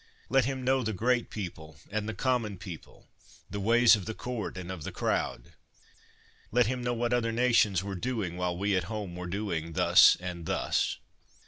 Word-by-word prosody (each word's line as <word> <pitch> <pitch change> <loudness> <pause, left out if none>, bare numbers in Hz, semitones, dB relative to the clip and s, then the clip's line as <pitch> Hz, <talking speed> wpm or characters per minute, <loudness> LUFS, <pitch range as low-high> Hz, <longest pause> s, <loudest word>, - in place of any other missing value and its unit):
Let 135 -1 +3
him 130 0 -3
know 130 +1 +2
the 110 -2 -2
great 120 +4 +1
people 80 -7 -7
and 110 +1 -2
the 110 - -4
common 115 -4 0
people, 90 -3 -11 0.4
the 100 - -3
ways 115 +3 +6
of 100 -4 -6
the 110 - -4
court 120 -7 -5
and 90 0 -6
of 95 -4 -6
the - - -5
crowd. - - -2 1.0
Let 125 +1 +4
him 125 +2 -2
know 120 0 0
what 120 +1 0
other 115 -2 +1
nations 115 -6 +3
were 100 0 -4
doing 105 -3 -3
while 90 -1 -2
we 100 +1 +1
at 90 -2 0
home 105 -4 -5
were 90 0 -6
doing 85 -4 -3
thus - - +6
and 90 -2 -6
thus. - - 0
105 Hz, 190 wpm, -29 LUFS, 90-120 Hz, 1.0 s, ways